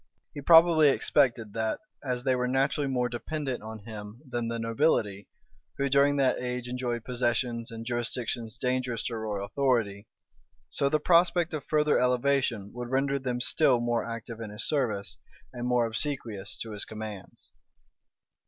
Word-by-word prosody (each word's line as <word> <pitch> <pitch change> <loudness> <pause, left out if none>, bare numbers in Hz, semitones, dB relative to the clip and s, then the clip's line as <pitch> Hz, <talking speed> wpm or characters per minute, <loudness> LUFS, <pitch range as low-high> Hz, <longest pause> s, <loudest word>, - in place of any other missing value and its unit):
[*] - - -49
He 145 - -6
probably 165 -1 +7
expected 115 -5 +2
that, 110 -1 -1 0.2
as 125 -2 -2
they 130 -1 +2
were 125 0 0
naturally 135 +2 +1
more 125 -2 0
dependent 130 +2 -4
on 110 -1 -8
him 105 0 -8
than 120 -2 -2
the 115 0 -2
nobility, 115 -4 0 0.5
who 140 0 0
during 140 +1 +4
that 135 -2 +2
age 125 0 -3
enjoyed 125 -2 -3
possessions 120 -1 -1
and 115 0 -7
jurisdictions 120 -1 -2
dangerous 125 -2 -1
to 120 - -3
royal 105 -2 -3
authority, 115 -5 0 0.6
so 140 - +1
the 155 - +2
prospect 175 0 +3
of 150 -3 -3
further 150 -1 +2
elevation 125 -4 +1
would 120 0 -6
render 135 +1 +1
them 125 -2 -2
still 125 +1 +3
more 120 0 0
active 115 0 -7
in 110 - -5
his 105 0 0
service, 115 -9 0 0.4
and 120 0 -4
more 125 -1 +3
obsequious 115 -4 -3
to 115 - -8
his 105 -1 0
commands. 110 -3 -9
125 Hz, 160 wpm, -28 LUFS, 115-135 Hz, 0.6 s, probably